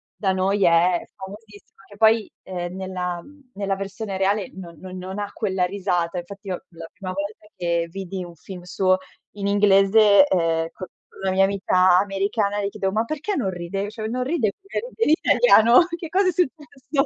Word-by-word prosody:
da 195 -3 0
noi 195 +1 +1
è 170 +1 +3
famosissima, 205 +1 -13
che 205 - -15
poi, 220 0 +3
ehm, 180 -1 -5
nella 180 -2 -4
mhmm, 285 +3 -19
nella 195 -1 -2
versione 195 +1 -5
reale 195 +1 0
no 175 -3 -9
non 185 +3 -9
non 190 +2 -6
ha 205 -1 -4
quella 190 -4 -1
risata. 180 -2 -1
Infatti, 195 +4 -8
io 180 - -5
la 165 -1 -10
prima 190 -2 -6
volta 200 +2 -6
che 170 -2 -1
vidi 190 0 -6
un 170 -1 -12
film 180 +3 -10
suo 185 +1 +1 0.4
in 200 -1 -3
inglese, 200 +3 +5
ehm, 165 - +1
con 185 - -8 0.4
una 190 - +1
mia 195 +1 +4
amica 185 -2 +3
americana, 200 +1 -1
le 200 - -1
chiedevo: 195 -1 -2
"Ma 220 +2 +1
perché 310 - -3
non 215 -8 0
ride 180 +3 -4
cioè 215 0 -7
non 250 +3 -2
ride 255 -8 0
come 395 +1 -4 0.2
ride 450 - +2
in - - +2 0.3
italiano. 245 - +6
Che 330 -2 -7
cosa 380 +2 +2
è 365 - +3
successo?" 290 -4 -1
195 Hz, 185 wpm, -23 LUFS, 185-215 Hz, 0.4 s, italiano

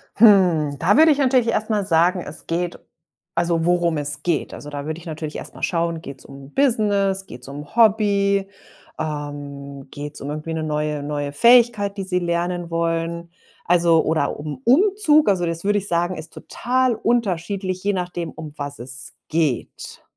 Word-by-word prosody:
Hm, 180 -9 +5
da 180 +7 +3
würde 315 0 +7
ich 285 - +2
natürlich 255 -4 +3
erst 220 -1 -1
mal 205 -2 0
sagen: 175 +2 +3
„Es 150 -2 -9
geht“ 175 +1 -2 0.6
also 170 -1 +1
worum 175 -2 +2
es 145 0 +1
geht. 170 -1 -1
Also, 150 - -9
da 145 -1 -6
würde 155 +1 -4
ich 170 - -13
natürlich 155 -1 -6
erst - - -8
mal - - -11
schauen, 170 -2 -1
geht's 140 -4 -10
um 135 +1 -13
Business, 205 -7 +1
geht's 125 -7 -11
um 145 +4 -9
Hobby, 200 -3 +3 0.5
ähm, 145 -2 -6
geht's 145 +1 -8
um 140 - -5
irgendwie 155 +2 -5
'ne 160 - -2
neue 150 -1 -2
neue 145 0 -3
Fähigkeit, 235 +1 +4
die 195 - -3
sie 185 -1 -1
lernen 175 0 -2
wollen? 170 0 -2 0.3
Also 170 -2 +4
oder 155 -3 -1
um 150 - -6
Umzug 310 - +4
also 185 -3 +1
das, 165 0 -4
würde 205 +1 +2
ich 200 - -6
sagen, 175 +1 0
ist 160 0 -9
total 255 0 0
unterschiedlich, 195 -5 -1
je 205 +1 +1
nachdem, 175 -2 -3
um 155 -2 -9
was 145 -1 -6
es 125 +1 -2 0.2
geht. 155 -6 -2
170 Hz, 175 wpm, -21 LUFS, 150-200 Hz, 0.6 s, würde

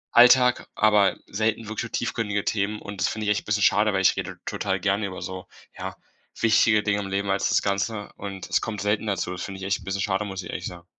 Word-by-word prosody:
Alltag, 125 +1 +6
aber 105 -2 +4
selten 110 +2 -1
wirklich 110 0 -3
so 115 - -4
tiefgründige 110 -4 -2
Themen 105 0 -1
und 100 -2 -7
das - - +3
finde 110 -1 -3
ich 105 - +2
echt 105 - +1
'n - - -35
bisschen 105 -1 +1
schade, 105 +2 +4
weil 95 - +1
ich 95 - +4
rede - - -5
total 95 -1 -2
gerne 100 +2 0
über 95 -1 -7
so, 95 0 -6 0.3
ja, - - -6 0.4
wichtige 110 -1 +4
Dinge 105 -1 +1
im 100 - -4
Leben 100 0 -1
als 95 - +1
das - - +2
Ganze 105 +1 -2
und 100 -2 -7
es - - +1
kommt 105 -3 -4
selten 105 +2 0
dazu. 95 -3 -1
Das 90 - -5
finde 95 -1 -6
ich - - -5
echt 100 +1 0
'n - - -13
bisschen 95 +1 -2
schade, 95 +1 0
muss 95 -2 -5
ich 85 - -9
ehrlich - - -4
sagen. 90 -1 -10
100 Hz, 250 wpm, -25 LUFS, 95-110 Hz, 0.4 s, Alltag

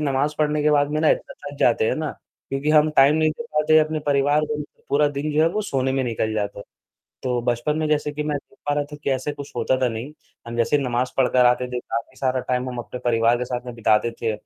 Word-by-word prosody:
नमाज 145 0 0
पढ़ने 150 0 +1
के 150 - +3
बाद 145 -1 +3
में 155 +1 0
ना 155 - +3
इतना - - -1
थक 145 - -10
जाते 120 -2 +3
हैं - - +1
ना, 155 -1 -2 0.4
क्योंकि 135 +2 -1
हम 155 0 +5
टाइम 140 +2 +6
नहीं 155 0 +3
दे 200 +10 -6
पाते, 155 +1 +4
अपने 155 0 +1
परिवार 145 +1 +3
को 150 0 -3 0.3
पूरा 145 +1 +3
दिन 145 +1 -3
जो 155 +1 +3
है 165 - +4
वो 210 +5 -2
सोने 135 -8 -1
में 135 - 0
निकल 110 -2 -1
जाता 100 -1 -3
है। 100 - -8 0.6
तो 125 -1 0
बचपन 120 +5 0
में 155 0 0
जैसे 150 -1 0
कि 150 +1 -4
मैं 150 -1 -1
देख - - -17
पा 145 - +2
रहा 145 0 0
था - - -6
कि - - 0
ऐसे 130 +2 -1
कुछ 145 -1 -9
होता 120 +2 +1
था 125 - +3
नहीं, 115 +5 -6 0.4
हम 115 - -5
जैसे 120 +5 +2
ही 140 - -2
नमाज 125 0 -1
पढ़कर 125 -1 +4
आते 125 +1 +3
थे 125 - -2
काफ़ी 115 -1 -5
सारा 130 -1 0
टाइम 125 0 -2
हम 125 - -6
अपने 125 +1 -7
परिवार 115 0 +3
के 125 - -3
साथ 125 0 -4
में 125 - -6
बिताते 110 0 +2
थे, 115 -1 +1
135 Hz, 265 wpm, -23 LUFS, 125-150 Hz, 0.6 s, टाइम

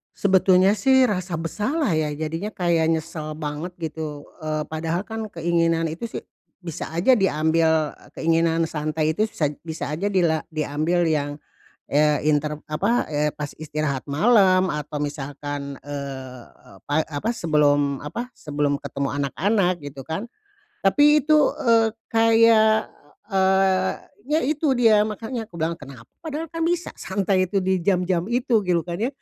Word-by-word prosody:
Sebetulnya 190 -1 +4
sih, 265 +6 +4
rasa 185 -6 -1
bersalah 210 - -1
ya, 155 -2 0
jadinya 165 +7 -4
kayak 170 -3 +1
nyesel 160 -1 -4
banget, 155 +3 -5
gitu, 155 -2 -5 0.2
eee, 155 -1 -2
padahal 160 +2 -2
kan, 225 0 -5
keinginan 165 -1 +1
itu 170 +9 -5
sih, - - -7 0.3
bisa 170 -4 -6
aja 170 +11 +3
diambil 160 -5 +2 0.2
keinginan 165 0 +2
santai 155 0 -1
itu 215 +6 0
sa 160 - -1 0.2
bisa 160 -2 -5
aja 190 +7 -1
dila 170 -5 +2
diambil 155 +3 0
yang 145 -2 -1 0.8
inter 150 0 0
apa, 200 +11 0
ya 150 0 0
pas 150 -1 -5
istirahat 150 -3 -3
malam, 185 +4 +4
atau 150 -2 -4
misalkan, 145 -1 -5
eee, 135 -3 -7 0.4
pai 145 +2 +1
apa, 160 +10 -2
sebelum, 145 -7 +2
apa, 235 +12 -5
sebelum 145 -1 -1
ketemu 140 -1 -4
anak-anak, 180 - 0
gitu 140 -2 -9
kan. 195 +9 -4 0.6
Tapi, 295 +8 +5
itu, 305 -1 +5 0.2
eee, 230 -2 +4 0.2
kayak, 225 -1 +4 0.4
eee, 190 -1 +3 0.4
ya, - - +2
itu 290 -1 +1
dia, 225 -3 +5
makanya 225 +2 -3
aku 170 - -13
bilang 165 0 -1
"Kenapa? 135 -5 -12
Padahal 315 -1 -4
kan 330 - -5
bisa 345 +1 -1
santai 190 -2 0
itu 200 - -3
di 190 -1 +1
jam-jam 180 0 0
itu," 240 -1 +2
gitu 180 -4 0
kan, 175 +1 -5
ya? 235 - +1
165 Hz, 140 wpm, -23 LUFS, 150-210 Hz, 0.8 s, Tapi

